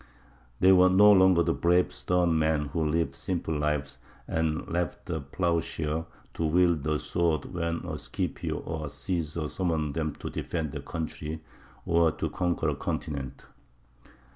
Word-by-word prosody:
They 95 - +6
were 95 0 +7
no 100 +3 +7
longer 95 -3 +6
the 85 0 +1
brave 90 +2 +2
stern 90 -3 +1
men 80 -1 +1
who 80 +2 -1
lived 80 +2 0
simple 85 -3 -3
lives 75 -2 -1 0.3
and 80 -1 -1
left 85 -1 -2
the 80 -3 -3
ploughshare 80 +1 -1 0.3
to - - -3
wield 85 0 +3
the 75 0 +1
sword 80 +1 0
when 85 0 -2
a 80 -3 -4
Scipio 70 - -3
or 80 -1 -4
a - - -5
Cæsar 75 +2 -3
summoned 80 -4 -1
them 80 -1 -2
to - - -6
defend 80 -4 -3
their - - -5
country 80 -1 -5 0.4
or 85 -1 +3
to - - -3
conquer 85 -3 0
a 75 - -1
continent. 70 -1 -4
80 Hz, 155 wpm, -28 LUFS, 75-85 Hz, 0.4 s, were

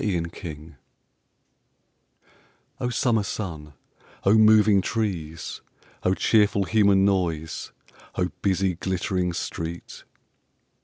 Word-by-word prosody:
O 125 - -1
Summer 115 -2 +1
sun, 80 -7 -5 0.5
O 100 - +4
moving 110 -2 +6
trees! 90 -8 -3 0.4
O 95 - +1
cheerful 105 -2 +3
human 100 0 +3
noise, 85 -5 -1 0.4
O 90 -1 0
busy 95 -1 +1
glittering 90 0 -1
street! 85 0 -6
95 Hz, 80 wpm, -25 LUFS, 85-105 Hz, 0.5 s, moving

